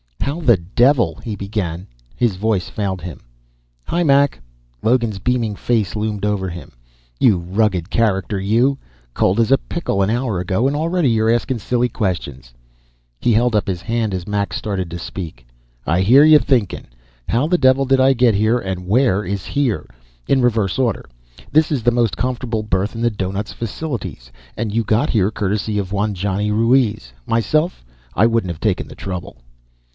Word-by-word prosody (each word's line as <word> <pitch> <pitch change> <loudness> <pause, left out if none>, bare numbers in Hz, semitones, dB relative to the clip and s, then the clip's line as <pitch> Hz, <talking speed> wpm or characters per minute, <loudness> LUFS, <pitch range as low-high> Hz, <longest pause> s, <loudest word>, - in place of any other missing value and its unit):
"How 145 +4 -2
the 120 - +4
devil 100 - +2
", - - -23
he 110 -3 -4
began. 95 -4 -4 0.3
His 120 -6 +1
voice 100 -1 -1
failed 95 -4 -3
him. 85 -6 -7 0.7
"Hi, 175 - -1
Mac." 140 - +3 0.4
Logan's 115 -4 +1
beaming 115 -1 0
face 110 -3 -1
loomed 105 -1 -2
over 100 -3 -1
him. 85 0 -9 0.5
"You 110 -7 +4
rugged 90 0 -1
character, 100 -3 0
you. 120 +8 +2 0.3
Cold 95 - +1
as 115 +2 +2
a 135 - +5
pickle 170 - -2
an 95 - +2
hour 115 -4 -1
ago, 95 +7 0
and 140 - -1
already 165 -1 +1
you're 110 -1 +2
askin' 120 +1 0
silly 125 +3 0
questions." 70 - -3 0.7
He 120 - +1
held 120 +1 +2
up 105 - +1
his 90 -3 -2
hand 115 -4 -1
as 90 -2 -5
Mac 100 -1 -1
started 95 -4 -3
to 85 - -6
speak. 80 -6 -7 0.4
"I 85 +5 +1
hear 125 +9 +6
you 155 -1 +7
thinkin'. 120 -10 0 0.4
'How 120 +5 +1
the 175 +3 +2
devil 130 0 +4
did 135 0 +3
I 135 +1 +5
get 125 -2 +3
here, 110 +4 +2
and 95 -5 -5
where 105 -2 +2
is 95 +1 -4
here?' 125 - -1 0.4
In 135 -1 +3
reverse 110 -4 +1
order, 120 -7 0 0.5
this 155 +2 +3
is 135 -6 -1
the 120 - +4
most 120 -3 +1
comfortable 125 -3 -2
berth 100 +1 -1
in 115 - -4
the 120 0 +2
doughnut's 100 0 -4
facilities, 115 - -5 0.3
and 110 -2 -2
you 115 +1 +1
got 110 +8 +1
here 100 -3 +2
courtesy 105 0 -2
of 100 -2 -3
one 100 +1 -1
Johnny 100 +2 -1
Ruiz. 110 - +2 0.2
Myself, 155 - 0 0.3
I 105 - +4
wouldn't 115 -5 +1
have 80 - -9
taken - - 0
the - - -11
trouble." 90 -8 -6
110 Hz, 180 wpm, -19 LUFS, 95-125 Hz, 0.7 s, you